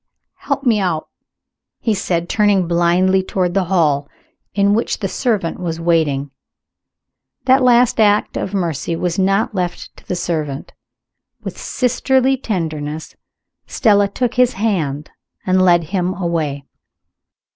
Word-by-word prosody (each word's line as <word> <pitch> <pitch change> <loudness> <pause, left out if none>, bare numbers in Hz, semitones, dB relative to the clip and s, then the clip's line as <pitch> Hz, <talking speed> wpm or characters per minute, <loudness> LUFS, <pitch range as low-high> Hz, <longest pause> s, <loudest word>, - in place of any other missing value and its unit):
"Help 275 - -3
me 230 -5 +3
out!" 175 -5 -2 0.7
he 225 - 0
said, 175 -3 -1
turning 205 -4 +2
blindly 175 +2 +2
toward 185 -1 -1
the 195 -1 +1
hall, 150 -6 +1 0.5
in 200 0 +3
which 230 +3 0
the 200 - -2
servant 200 -6 -1
was 165 -2 -3
waiting. 155 -5 +1 1.1
That 265 +1 +5
last 245 -2 +4
act 210 -1 +3
of 190 - -3
mercy 170 -4 -2
was 175 +2 -2
not 195 +4 +1
left 180 -3 -4
to - - -10
a - - 0
servant. 155 -5 -3 0.7
With - - -6
sisterly 260 +1 +1
tenderness, 160 - -4 0.5
Stella 205 -5 +3
took 245 +3 -2
his 250 -1 +3
hand 160 -9 -2 0.3
and 185 0 +3
led 175 -2 +4
him 185 -1 0
away. 160 -6 -2
185 Hz, 130 wpm, -18 LUFS, 165-210 Hz, 1.1 s, That